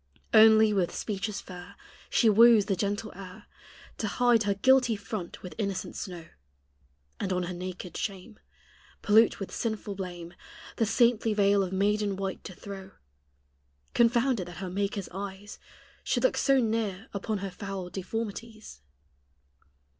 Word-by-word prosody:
Only 220 -1 +7
with 185 -4 0
speeches 210 0 -3
fair 180 +1 -11 0.3
She 230 - +3
woos 220 0 +7
the 195 -2 0
gentle 205 +3 -2
air 185 -1 -11 0.5
To 220 - -1
hide 240 +1 +3
her 200 -1 +1
guilty 255 +2 +4
front 200 -3 -7
with 180 - -7
innocent 200 -3 -3
snow, 175 -4 -7 0.9
And 190 - -2
on 180 -1 0
her 180 +1 -4
naked 180 0 -7
shame. 200 +2 -5 0.6
Pollute 220 +2 +4
with 195 - -6
sinful 220 -2 -3
blame, 175 -3 -7 0.4
The 225 - +1
saintly 230 -2 +2
veil 200 -1 +4
of 185 -2 -2
maiden 205 +1 +1
white 195 0 -4
to 185 - -8
throw 195 -1 -9 1.0
Confounded 235 -4 +2
that 175 -2 -10
her 185 0 -5
maker's 200 +1 -2
eyes 195 +2 -7 0.4
Should - - 0
look - - +3
so 275 -1 +3
near 220 -4 -1
upon 210 +2 -2
her 195 - -5
foul 195 -2 -6
deformities. 220 - -6
200 Hz, 140 wpm, -28 LUFS, 190-220 Hz, 1.0 s, Only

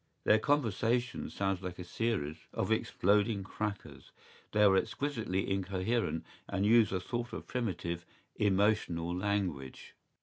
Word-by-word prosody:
¬Ý - - -44
Their 110 - +5
conversation 120 -2 +1
sounds 95 -2 -1
like 90 -1 -5
a 90 - -6
series 85 -6 -2
of - - -1
exploding 100 +1 +2
crackers; 105 +1 -5 0.4
they 105 - +4
are 100 -2 +6
exquisitely 110 -3 -1
incoherent 95 0 -1 0.2
and 100 0 0
use 110 -1 +5
a 95 - 0
sort 120 +5 -4
of - - -5
primitive, 85 -8 -3 0.3
emotional 95 -4 +1
language. 90 -9 -2
100 Hz, 130 wpm, -32 LUFS, 90-110 Hz, 0.4 s, are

